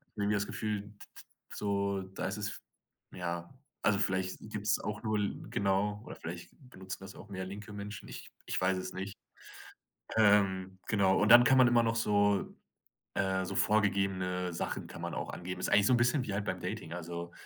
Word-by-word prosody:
Irgendwie 105 0 +1
das 100 0 0
Gefühl, 105 -2 -2
d 105 - -13
d 100 - -14 0.3
so 100 -1 0
da 95 +1 -5
ist - - -3
es - - -4 0.5
ja, 85 +1 -4 0.3
also 100 -2 +3
vielleicht 95 -1 0
gibt's 105 -1 -1
auch 105 0 -4
nur 110 -1 +1
l 100 - -2
genau, 100 +1 +1
oder - - -8
vielleicht - - -7 0.2
benutzen 95 -4 -7
das 95 +1 -9
auch - - -11
mehr 95 -1 -4
linke 105 +2 -8
Menschen, 105 +1 -7
ich - - -9
ich - - -1
weiß 95 0 +2
es 95 - -5
nicht. 95 +2 -5 1.0
Ähm, 95 -3 +3
genau, 95 -3 +3
und 105 - +3
dann 120 0 +11
kann 135 -2 +6
man 125 -1 +7
immer 120 0 +5
noch 115 0 +1
so 100 -2 +2 0.6
äh, 95 -1 +1
so 100 - -4
vorgegebene 95 -3 +1
Sachen - - -3
kann - - -9
man - - -3
auch - - -3
angeben. 95 +1 -5
Das - - 0
ist - - -2
eigentlich 100 -1 +5
so 125 - +5
'n - - +4
bisschen 120 +4 +3
wie 100 - -4
halt 100 0 -1
beim 90 -1 -2
Dating, 90 -3 -5
also, 85 0 -6
100 Hz, 200 wpm, -32 LUFS, 95-105 Hz, 1.0 s, dann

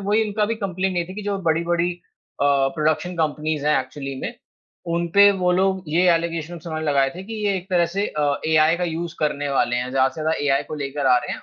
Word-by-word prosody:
वही 205 +3 +1
इनका 210 0 0
भी 230 - -1
कम्प्लेंट 185 0 -1
ये 175 - +1
थी 185 - -8
कि 210 - -6
जो 200 -1 -2
बड़ी-बड़ी 170 +2 +1 0.5
अ, 145 - +4 0.3
प्रोडक्शन 155 +3 0
कंपनीज़ 155 -1 -1
हैं 150 -2 +4
एक्चुअली 135 +1 -7
में, - - -4 0.5
उन 170 0 0
पे 200 0 +8
वो 180 0 +2
लोग 190 +1 +1
ये 165 +4 +2
एलिगेशन्स 165 0 -4
उन्होंने 160 -1 -3
लगाए 135 -2 +2
थे 185 - -7
कि 225 +2 -7
ये 200 - +2
एक 185 0 -7
तरह 175 -2 +3
से 205 - +1
अ, 145 -1 -1
एआई 155 +1 +4
का 180 - -1
यूज़ 170 0 -4
करने 145 -1 -1
वाले 120 -3 +1
हैं 125 +1 -2
ज़्यादा 130 0 +3
से - - -7
ज़्यादा 160 +1 0
एआई 140 0 +2
को - - -4
लेकर 140 0 -2
आ 125 -1 +6
रहे - - -5
हैं - - -7
165 Hz, 235 wpm, -22 LUFS, 145-180 Hz, 0.5 s, पे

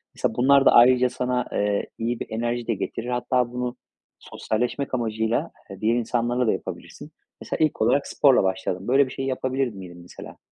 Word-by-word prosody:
Mesela, 110 - -1
bunlar 135 +2 +4
da - - +7
ayrıca 125 +1 +6
sana, 125 0 -2
eee, 100 0 -1
iyi 115 +1 -2
bir - - -5
enerji 120 +1 -3
de 115 - +1
getirir. 115 +4 -5
Hatta, 125 0 0
bunu 125 0 -4 0.4
sosyalleşmek 125 +5 -3
amacıyla, 110 -1 -1 0.2
eee, 100 +1 -10
diğer 115 +2 +2
insanlarla 120 +1 0
da - - +4
yapabilirsin. - - -8 0.3
Mesela, - - -4
ilk 150 - -4
olarak 140 - +2
sporla 135 -7 +4
başladın. 95 +1 -2
Böyle 135 +2 +4
bir - - -9
şeyi 135 0 -4
yapabilir 130 0 -1
miydin, 90 -3 -11
mesela? 85 - -12
120 Hz, 175 wpm, -24 LUFS, 110-125 Hz, 0.4 s, da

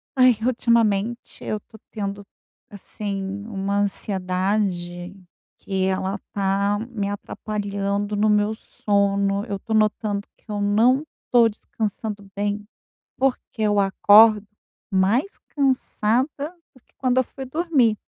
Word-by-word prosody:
Ai 255 -2 +6
ultimamente 235 -2 +1
eu 215 - -2
tô 220 - -16
tendo, 200 -2 -4 0.4
assim, 200 0 -5
uma 200 -1 -2
ansiedade, 185 -2 -1 0.4
que 190 -1 -2
ela 190 +1 -1 0.2
tá 200 +1 +1
me 205 -4 -2
atrapalhando 205 0 -3
no 210 +1 +2
meu 210 +1 +3
sono. 200 -1 0
Eu 200 -4 -4
tô 220 - -5
notando 215 -1 +1
que - - -34
eu 205 -1 -2
não 230 +7 +3 0.3
tô 240 -2 +6
descansando 210 -1 -5
bem, 205 +1 -2 0.5
porque 260 -3 -1
eu 205 -1 +2
acordo 210 +2 +6 0.4
mais 205 - +1
cansada 260 -3 +1 0.5
do 255 - -20
que - - -38
quando 255 -1 +2
eu 260 - +3
fui 265 +2 -8
dormir. 265 -6 +2
205 Hz, 120 wpm, -23 LUFS, 200-225 Hz, 0.5 s, Ai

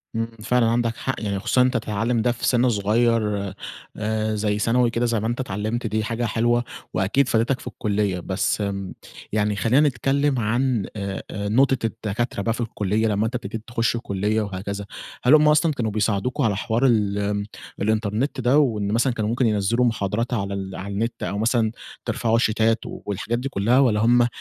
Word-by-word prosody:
امم، 115 0 0 0.2
فعلًا 125 +1 +2
عندك 115 0 +1
حق، 135 - -2
يعني 100 -2 -2
خصوصًا 120 +4 +2
إن - - +5
أنتَ 125 - 0
تتعلم 115 +2 -1
ده 120 - +2
في 120 - -3
سن 125 0 +3
صغيّر، 105 -2 +1 0.4
آآ، 110 0 -1
زي 105 0 0
ثانوي 120 +3 +2
كده 115 +1 0
زي 115 -2 +1
ما 110 - -2
أنتَ 120 +2 -2
اتعلمت 110 +1 -2
دي 110 +1 -1
حاجة 115 +2 -2
حلوة، 120 +2 +1 0.3
وأكيد 100 +9 +2
فادتك 120 +2 +1
في - - -10
الكلية. 100 -3 -1
بس 95 +4 -1
امم، 100 -2 -3 0.4
يعني 105 0 +1
خلِّينا 130 +8 +3
نتكلّم 135 +1 +1
عن 120 0 +1
آآ 100 -2 -4
آآ، 100 0 -3
نقطة 135 +4 +3
الدكاترة 110 0 -2
بقى 115 +3 0
في 120 - -5
الكلية، 110 -1 0
لمّا 105 0 +1
أنتَ 115 +3 -3
ابتديت 110 -2 -5
تخش 120 0 0
الكلية 105 -1 -1
وهكذا، 100 0 -4 0.4
هل 125 - +5
هم 150 0 +5
أصلًا 155 +2 +4
كانوا 115 -5 -2
بيساعدوكم 110 +6 0
على 110 -4 +2
حوار 115 +5 0
ال 105 -3 +1 0.4
الإنترنت 110 +6 0
ده، 125 +4 +3
وإن 105 -8 +1
مثلًا 120 +3 +2
كانوا 110 -2 -2
ممكن 120 +2 +1
ينزلوا 110 +3 +2
محاضرات 115 +1 -1
على 100 -4 -2
ال 95 -1 -5
على 100 +1 -6
النت، 115 +3 -2
أو 95 +3 -2
مثلًا 110 0 +1 0.3
ترفعوا 115 0 +1
شيتات 110 0 +2
والحاجات 105 +4 -4
دي 135 +2 -3
كلّها 115 +4 +2
والّا 115 -6 +3
هم 120 +2 +4
110 Hz, 185 wpm, -23 LUFS, 105-120 Hz, 0.4 s, إن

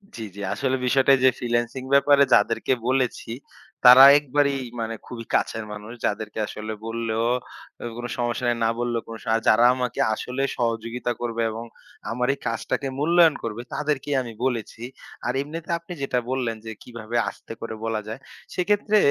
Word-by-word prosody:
জ্বি, 115 - -5
জ্বি। 100 - -8
আসলে 130 -1 0
বিষয়টা 135 +2 +4
যে, 130 - +8
ফ্রিল্যান্সিং 120 +1 -1
ব্যাপারে 140 0 +6
যাদেরকে 115 +5 +3
বলেছি, 130 -3 0 0.6
তারা 125 +2 +11 0.2
একবারেই 140 -1 0 0.2
মানে 115 0 -3
খুবই 115 -2 -7
কাছের 110 -1 0
মানুষ 105 +2 -8
যাদেরকে 105 +1 -3
আসলে 110 +1 -6
বললেও 115 0 -2 0.6
অ - - -4
কোন 120 - -5
সমস্যা 120 +1 -1
নাই, 120 - +1
না - - +3
বললেও 120 -1 -1
কোন 115 - -7
সা - - 0 0.2
যারা 115 +2 +6
আমাকে 125 -2 -3
আসলে 125 +4 -4 0.2
সহযোগিতা 115 +1 -2
করবে 115 -1 -2
এবং 115 +2 -6 0.5
আমার 125 +1 -1
এই 140 - -10
কাজটাকে 125 +4 -2
মূল্যায়ন 165 0 +5
করবে, 115 +1 -4
তাদেরকেই 145 -1 -1
আমি 120 -2 -7
বলেছি। 115 -3 -3 0.4
আর 120 - 0
এমনিতে 160 +3 -7
আপনি 170 +2 -9
যেটা 130 -2 0
বললেন, 125 -3 -1
যে, 110 - -5
কিভাবে 115 -1 -8
আস্তে - - -11
করে 115 -1 -5
বলা 110 -1 -1
যায়? 110 +4 -6 0.3
সেক্ষেত্রে 205 +3 +2
120 Hz, 165 wpm, -24 LUFS, 115-135 Hz, 0.6 s, তারা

